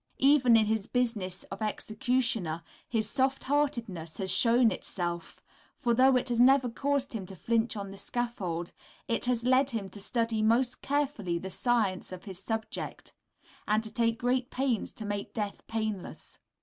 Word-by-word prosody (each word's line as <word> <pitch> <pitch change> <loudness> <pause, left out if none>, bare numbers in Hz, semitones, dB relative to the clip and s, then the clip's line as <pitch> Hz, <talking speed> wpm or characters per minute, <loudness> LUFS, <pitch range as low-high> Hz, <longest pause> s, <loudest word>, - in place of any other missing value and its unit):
Even 265 -4 +6
in 220 - +4
his 220 -1 0
business 210 -7 -1
as 195 - -6
executioner 215 -5 0 0.3
his 220 -3 0
soft 265 +3 +1
heartedness 235 - -1
has 190 -1 0
shown 230 +4 +5
itself, 175 -2 -4 0.3
for 240 -2 +1
though 260 +2 +5
it 250 0 +1
has 240 -1 +2
never 260 0 +5
caused 275 +2 -1
him 200 -5 -5
to 190 - -9
flinch 230 +4 0
on 200 -1 -5
the 195 - -9
scaffold, 195 -8 -3 0.4
it 230 - -1
has 245 -2 0
led 260 +2 +4
him 210 -6 -4
to 205 - -8
study 230 0 0
most 235 +3 +2
carefully 270 -11 -1
the 190 +2 -6
science 215 -8 0
of 185 0 -8
his 190 -4 -7
subject, 220 +2 -4 0.5
and 215 +1 +2
to 220 - -6
take 230 -1 +1
great 245 +1 0
pains 255 -4 -1
to 215 - -8
make 205 -1 -4
death 210 -3 -3
painless. 215 -4 -4
225 Hz, 165 wpm, -29 LUFS, 200-250 Hz, 0.5 s, Even